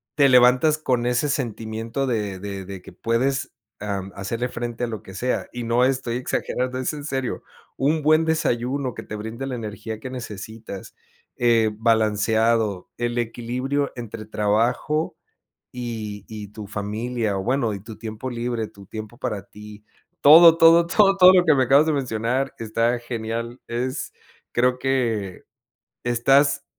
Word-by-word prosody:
te 140 Hz, -2 st, +5 dB
levantas 125 Hz, +4 st, +5 dB
con 125 Hz, -6 st, 0 dB
ese 125 Hz, +4 st, +1 dB
sentimiento 115 Hz, -1 st, -3 dB
de 105 Hz, -6 st, -2 dB
de 100 Hz, -1 st, -6 dB
de 95 Hz, -1 st, -8 dB
que 95 Hz, -, -12 dB
puedes, 130 Hz, +7 st, -1 dB, 0.3 s
am, 100 Hz, -2 st, -4 dB
hacerle 115 Hz, +5 st, -3 dB
frente 120 Hz, 0 st, -4 dB
a -, -, -4 dB
lo 110 Hz, -4 st, -5 dB
que 95 Hz, -, -11 dB
sea, 125 Hz, +6 st, -1 dB
y 120 Hz, -, -4 dB
no 115 Hz, +2 st, +2 dB
estoy 130 Hz, -3 st, -1 dB
exagerando, 125 Hz, 0 st, -2 dB
es 130 Hz, -, -2 dB
en 145 Hz, -1 st, -7 dB
serio. 135 Hz, -4 st, -3 dB, 0.3 s
Un 150 Hz, +4 st, +1 dB
buen 155 Hz, +1 st, +4 dB
desayuno 130 Hz, -4 st, 0 dB
que -, -, -7 dB
te 105 Hz, -, -7 dB
brinde 110 Hz, +5 st, -5 dB
la 130 Hz, -, -3 dB
energía 110 Hz, -1 st, -6 dB
que 130 Hz, -, -7 dB
necesitas, 110 Hz, -4 st, -8 dB, 0.4 s
eh, 115 Hz, -2 st, +3 dB
balanceado, 110 Hz, -2 st, +1 dB
el 120 Hz, 0 st, -2 dB
equilibrio 125 Hz, +4 st, -2 dB
entre 115 Hz, -2 st, -7 dB
trabajo 110 Hz, +9 st, 0 dB, 0.6 s
y 110 Hz, -4 st, -6 dB
y 105 Hz, -2 st, -7 dB
tu 105 Hz, +1 st, -9 dB
familia, 110 Hz, +1 st, -2 dB
o 95 Hz, -, -3 dB
bueno, 120 Hz, -2 st, 0 dB
y 100 Hz, -, -5 dB
tu 110 Hz, 0 st, -10 dB
tiempo 110 Hz, +3 st, -6 dB
libre, 120 Hz, -2 st, -2 dB
tu 100 Hz, -1 st, -15 dB
tiempo 110 Hz, +2 st, -8 dB
para 105 Hz, -5 st, -3 dB
ti, 105 Hz, +1 st, -13 dB, 0.4 s
todo, 165 Hz, +3 st, +9 dB
todo, 165 Hz, +1 st, +6 dB
todo, 195 Hz, +2 st, +4 dB
todo 185 Hz, 0 st, +9 dB
lo 180 Hz, -1 st, +5 dB
que 155 Hz, -, +6 dB
me 130 Hz, -2 st, +3 dB
acabas 140 Hz, +4 st, +5 dB
de 160 Hz, -, +1 dB
mencionar 130 Hz, 0 st, -1 dB
está 115 Hz, +2 st, 0 dB
genial, 115 Hz, 0 st, -5 dB
es 125 Hz, +3 st, -3 dB, 0.4 s
creo 125 Hz, +1 st, +2 dB
que 115 Hz, -8 st, -1 dB, 0.6 s
estás 135 Hz, +4 st, +3 dB
120 Hz, 155 wpm, -23 LUFS, 110-130 Hz, 0.6 s, todo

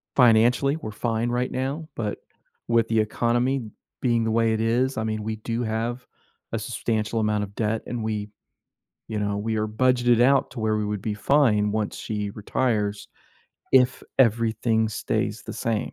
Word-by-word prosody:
financially, 125 Hz, +4 st, +4 dB
we're 110 Hz, -, -6 dB
fine 115 Hz, +2 st, -1 dB
right 125 Hz, +1 st, -1 dB
now, 135 Hz, +5 st, -3 dB
but 105 Hz, -3 st, -3 dB, 0.5 s
with 115 Hz, -1 st, +3 dB
the 115 Hz, -1 st, +2 dB
economy 120 Hz, +4 st, +1 dB, 0.4 s
being 120 Hz, -2 st, +2 dB
the 110 Hz, -, 0 dB
way 115 Hz, 0 st, +2 dB
it 110 Hz, -, -1 dB
is, 120 Hz, +3 st, +1 dB
I 110 Hz, -, 0 dB
mean, 110 Hz, -1 st, -2 dB
we 110 Hz, 0 st, -2 dB
do 115 Hz, +2 st, -3 dB
have 115 Hz, +3 st, -2 dB, 0.5 s
a -, -, +1 dB
substantial 110 Hz, 0 st, -2 dB
amount 105 Hz, -1 st, +1 dB
of 100 Hz, -, -8 dB
debt, 110 Hz, 0 st, -1 dB
and 120 Hz, -2 st, -3 dB
we 105 Hz, -1 st, -3 dB, 0.8 s
you 110 Hz, -, -3 dB
know, 105 Hz, 0 st, -1 dB
we 110 Hz, +2 st, -2 dB
are 110 Hz, 0 st, 0 dB
budgeted 120 Hz, +1 st, +3 dB
out 135 Hz, +2 st, +4 dB
to 125 Hz, -, -6 dB
where 110 Hz, 0 st, +1 dB
we 105 Hz, -, -1 dB
would 105 Hz, -1 st, -3 dB
be 110 Hz, -, -2 dB
fine 105 Hz, -4 st, +3 dB
once 110 Hz, -1 st, -2 dB
she 105 Hz, -2 st, -3 dB
retires 105 Hz, -1 st, -1 dB, 0.6 s
if 130 Hz, -1 st, +4 dB, 0.2 s
everything 110 Hz, -1 st, +2 dB
stays 110 Hz, -, -2 dB
the -, -, -7 dB
same. 115 Hz, -2 st, -2 dB
115 Hz, 175 wpm, -25 LUFS, 110-120 Hz, 0.8 s, financially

